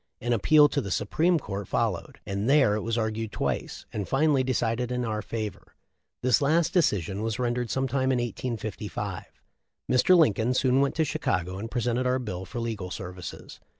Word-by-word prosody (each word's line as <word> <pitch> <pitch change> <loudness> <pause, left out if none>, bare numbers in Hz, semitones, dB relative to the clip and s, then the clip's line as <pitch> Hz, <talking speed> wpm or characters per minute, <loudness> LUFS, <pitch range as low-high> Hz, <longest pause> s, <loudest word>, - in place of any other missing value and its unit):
An 120 +1 0
appeal 150 +7 +6
to 140 - 0
the 100 - -5
Supreme 160 - +2
Court 100 - -5
followed, - - -2
and 100 +4 -2
there 135 -7 +5
it 105 - -1
was 115 +2 -2
argued 110 -1 -2
twice, - - -3
and 105 -3 -3
finally 140 -1 +3
decided 125 -1 -1
in 125 0 -1
our 110 -1 -2
favor. 110 -2 -6 0.5
This 125 0 +3
last 165 +4 +2
decision 105 - +1
was 110 0 -2
rendered 120 -1 -1
some 135 0 0
time 130 +1 +1
in 130 - +2
1855. 115 -3 -4 0.7
Mr. 155 +8 +5
Lincoln 125 - +3
soon 130 +1 +3
went 140 - +1
to 160 - +2
Chicago 90 - -2
and 115 +2 -5
presented 120 +1 0
our 125 +1 +2
bill 95 -7 -5
for 105 +7 -6
legal 110 -6 -3
services. 90 0 -8
120 Hz, 180 wpm, -27 LUFS, 105-130 Hz, 0.7 s, appeal